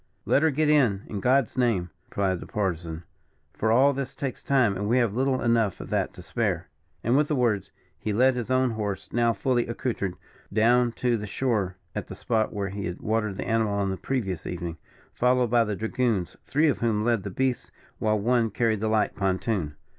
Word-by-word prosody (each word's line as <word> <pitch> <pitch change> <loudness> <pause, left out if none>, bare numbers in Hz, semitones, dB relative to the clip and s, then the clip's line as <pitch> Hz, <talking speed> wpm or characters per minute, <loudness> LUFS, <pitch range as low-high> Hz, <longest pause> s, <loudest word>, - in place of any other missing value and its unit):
"Let 140 - +3
her 160 - +4
get 155 +1 +1
in, 125 -10 +3
in 105 - -5
God's 130 +3 +2
name!" 100 -9 +1 0.2
replied 95 -3 0
the - - -9
Partisan, 85 -5 -3 0.5
"for 110 - 0
all 135 +5 +5
this 135 -1 -4
takes 135 -3 -4
time, 125 -8 +2
and 100 +2 -2
we 120 - +3
have 120 -5 +2
little 130 +2 +1
enough 115 -5 +2
of - - -8
that - - 0
to - - -10
spare." - - -1 0.3
And, 120 +3 +2
with 150 +1 +3
the 150 - 0
words, 110 -6 +1 0.3
he 110 - -2
led 130 +5 +4
his 125 -2 -4
own 130 -1 +2
horse, 105 -3 -4
now 120 0 +3
fully 120 +3 0
accoutered, 115 -6 -2 0.4
down 120 +3 +4
to 120 -1 +1
the 105 -1 -5
shore, 100 -5 -1 0.2
at - - -4
the - - -8
spot 110 -2 0
where 100 -2 -3
he 100 -1 -4
had 90 - -5
watered 110 -2 -1
the - - -4
animal 110 -2 +1
on 100 -1 0
the - - -1
previous 95 -4 -3
evening, 85 -2 -4 0.4
followed 125 -1 +2
by 120 -1 +5
the 105 -2 -2
dragoons, 110 -3 -1
three 150 +3 +2
of 145 - +1
whom 110 -3 +1
led 115 -2 +2
the 100 - -5
beasts, 130 +5 -1 0.3
while 110 0 +2
one 115 +2 +2
carried 110 0 +1
the 110 - -1
light 110 -1 +1
pontoon. 95 -4 -1
110 Hz, 205 wpm, -26 LUFS, 100-125 Hz, 0.5 s, all